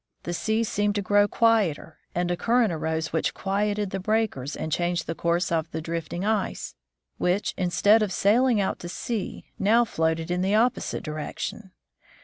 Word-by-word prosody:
The 175 - -3
sea 220 +5 0
seemed 205 -1 0
to 205 - -1
grow 205 +1 +4
quieter, 205 -10 +1 0.2
and 175 0 0
a - - +1
current 230 0 +2
arose 160 0 -2
which 160 - 0
quieted 205 0 -1
the 195 - -2
breakers 195 - -1
and 160 - -4
changed 175 +2 0
the 165 - -3
course 170 +2 0
of 165 -1 0
the 160 - -4
drifting 165 +3 -4
ice, 215 -2 -1 0.5
which, 180 +3 +1
instead 185 +5 +3
of 210 -3 0
sailing 225 +5 +3
out 195 - -1
to 175 - -7
sea, 215 +2 -4
now 225 +4 +4
floated 160 -4 -1
in 180 0 0
the 195 +3 +2
opposite 240 +3 +1
direction. 180 +7 -5
190 Hz, 170 wpm, -26 LUFS, 170-215 Hz, 0.5 s, grow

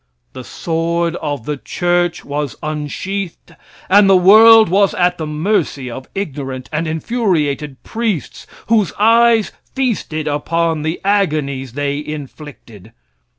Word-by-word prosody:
The 130 - -8
sword 170 +3 -2
of 145 -6 -4
the 150 -1 -3
church 175 +3 -1
was 145 -1 -3
unsheathed, 160 +5 -5 0.3
and 200 +1 +5
the 190 - +6
world 220 +4 +7
was 195 +2 +2
at 180 -1 +1
the 155 - -3
mercy 150 - -1
of 130 +2 -9
ignorant 135 -9 -5
and 160 +2 -1
infuriated 155 - -2
priests, 220 - -4 0.2
whose 215 -5 +1
eyes 230 0 +4 0.2
feasted 210 - -2
upon 160 +2 -1
the 160 +3 -3
agonies 150 - 0
they 145 +1 -2
inflicted. 140 - -10
160 Hz, 120 wpm, -17 LUFS, 145-195 Hz, 0.3 s, world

